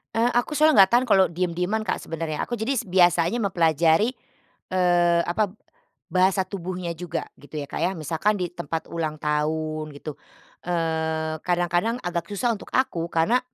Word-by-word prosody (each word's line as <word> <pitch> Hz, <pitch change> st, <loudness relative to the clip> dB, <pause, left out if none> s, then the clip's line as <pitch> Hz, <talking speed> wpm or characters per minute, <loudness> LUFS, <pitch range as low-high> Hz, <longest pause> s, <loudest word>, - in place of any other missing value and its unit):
Eee, 230 Hz, +1 st, +3 dB
aku 240 Hz, +5 st, +1 dB
soalnya 305 Hz, -8 st, +6 dB
enggak 190 Hz, -, 0 dB
tahan 245 Hz, +2 st, +4 dB
kalau 190 Hz, -3 st, +5 dB
diem-dieman, 180 Hz, +5 st, -1 dB
Kak, -, -, +1 dB
sebenarnya, 160 Hz, -2 st, -3 dB
aku 240 Hz, -, -4 dB
jadi 240 Hz, +2 st, 0 dB
biasanya 175 Hz, +2 st, +3 dB
mempelajari, 170 Hz, -, +3 dB, 0.6 s
eee, 175 Hz, -2 st, +3 dB
apa, 195 Hz, +3 st, 0 dB, 0.6 s
bahasa 190 Hz, +2 st, +3 dB
tubuhnya 185 Hz, -2 st, -4 dB
juga 170 Hz, 0 st, -4 dB, 0.2 s
gitu 145 Hz, +2 st, -14 dB
ya, -, -, -3 dB
Kak, -, -, -5 dB
ya. 175 Hz, +4 st, +1 dB
Misalkan 165 Hz, +6 st, 0 dB
di 180 Hz, -2 st, -2 dB
tempat 165 Hz, -2 st, -5 dB
ulang 160 Hz, -2 st, -2 dB
tahun 155 Hz, +1 st, -1 dB
gitu, 145 Hz, 0 st, -7 dB, 0.5 s
eee, 160 Hz, -2 st, -1 dB
kadang-kadang 175 Hz, +5 st, +1 dB
agak 170 Hz, -1 st, -3 dB
susah 225 Hz, +4 st, 0 dB
untuk -, -, -12 dB
aku, 170 Hz, -10 st, 0 dB
karena 170 Hz, +10 st, +3 dB
175 Hz, 155 wpm, -24 LUFS, 160-195 Hz, 0.6 s, soalnya